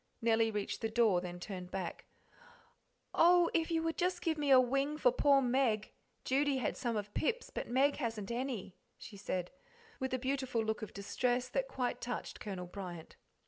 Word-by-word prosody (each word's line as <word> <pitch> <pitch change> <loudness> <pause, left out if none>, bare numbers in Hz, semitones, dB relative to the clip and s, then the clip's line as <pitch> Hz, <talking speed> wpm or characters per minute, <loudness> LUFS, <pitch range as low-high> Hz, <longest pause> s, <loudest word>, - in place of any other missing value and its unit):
Nellie 225 -1 +3
reached 210 -2 -3
the 225 - 0
door, 220 -6 +3
then 175 -1 -6
turned 180 -1 -6
back. 185 -2 -5 1.1
"Oh, 350 0 +5
if 325 -1 +1
you 325 -1 +1
would 325 -2 -1
just 365 +1 +1
give 325 -2 +1
me 295 -2 -1
a 265 -1 +9
wing 275 +4 +1
for - - +4
poor 280 - +4
Meg 240 -4 +1 0.3
Judy 275 +1 +2
had 255 - -1
some 235 -3 -1
of 205 0 -5
Pip's, 475 +9 -1
but - - -4
Meg 270 +4 +3
hasn't 225 -6 -3
any," 235 -6 -3 0.2
she 210 - -10
said, 185 -3 -3 0.5
with 260 -1 -2
a 255 - +1
beautiful 255 -3 -1
look 220 +2 -1
of 215 - -6
distress 245 +5 -1
that - - -1
quite 255 - -2
touched 245 0 -4
Colonel 190 -4 -5
Bryant. 175 -3 -8
245 Hz, 185 wpm, -34 LUFS, 210-280 Hz, 1.1 s, a